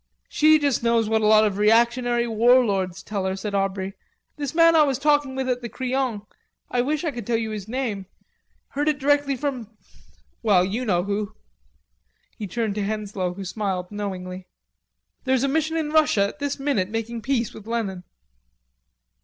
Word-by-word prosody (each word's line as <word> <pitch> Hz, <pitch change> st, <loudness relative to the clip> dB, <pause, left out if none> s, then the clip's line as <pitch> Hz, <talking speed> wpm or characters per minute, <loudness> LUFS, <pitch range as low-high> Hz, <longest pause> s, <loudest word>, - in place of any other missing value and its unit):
"She 310 Hz, +1 st, +5 dB
just 285 Hz, -4 st, 0 dB
knows 230 Hz, -1 st, +2 dB
what 220 Hz, 0 st, +1 dB
a 210 Hz, -, +2 dB
lot 215 Hz, 0 st, +6 dB
of 205 Hz, -1 st, -1 dB
reactionary 235 Hz, +2 st, +3 dB
warlords 215 Hz, -5 st, +2 dB
tell 200 Hz, -2 st, -3 dB
her," 190 Hz, 0 st, -1 dB
said 200 Hz, +1 st, -5 dB
Aubrey. 195 Hz, -1 st, -1 dB, 0.4 s
"This 290 Hz, 0 st, -5 dB
man 330 Hz, 0 st, +6 dB
I 315 Hz, -, +7 dB
was 275 Hz, -4 st, +2 dB
talking 290 Hz, -1 st, +2 dB
with 265 Hz, -1 st, -2 dB
at 250 Hz, -1 st, -1 dB
the 235 Hz, -, -5 dB
Crillon 255 Hz, -4 st, -2 dB, 0.5 s
I 245 Hz, -, +2 dB
wish 295 Hz, +5 st, -1 dB
I 320 Hz, -, 0 dB
could 240 Hz, -5 st, -7 dB
tell 235 Hz, -1 st, +2 dB
you 225 Hz, -1 st, -3 dB
his 210 Hz, -2 st, -6 dB
name 220 Hz, -6 st, -3 dB, 0.6 s
heard 290 Hz, +2 st, 0 dB
it 300 Hz, -, 0 dB
directly 285 Hz, 0 st, +2 dB
from...Well, 225 Hz, -6 st, -3 dB
you 220 Hz, +7 st, -3 dB
know 175 Hz, -5 st, +1 dB
who." 205 Hz, +1 st, -3 dB, 1.0 s
He 210 Hz, -, -6 dB
turned 220 Hz, +2 st, -2 dB
to 205 Hz, 0 st, -2 dB
Henslowe, 200 Hz, -3 st, -3 dB
who 195 Hz, 0 st, -7 dB
smiled 185 Hz, -2 st, -3 dB
knowingly. 185 Hz, -3 st, -5 dB, 0.8 s
"There's 260 Hz, -1 st, +2 dB
a -, -, +2 dB
mission 320 Hz, +3 st, 0 dB
in 305 Hz, -2 st, -2 dB
Russia 300 Hz, -11 st, +3 dB
at 295 Hz, -, -13 dB
this 285 Hz, -1 st, -2 dB
minute 270 Hz, -10 st, 0 dB
making 225 Hz, +1 st, -4 dB
peace 240 Hz, -2 st, -1 dB
with 220 Hz, -, -12 dB
Lenin." 205 Hz, -6 st, -3 dB
230 Hz, 175 wpm, -24 LUFS, 200-270 Hz, 1.0 s, I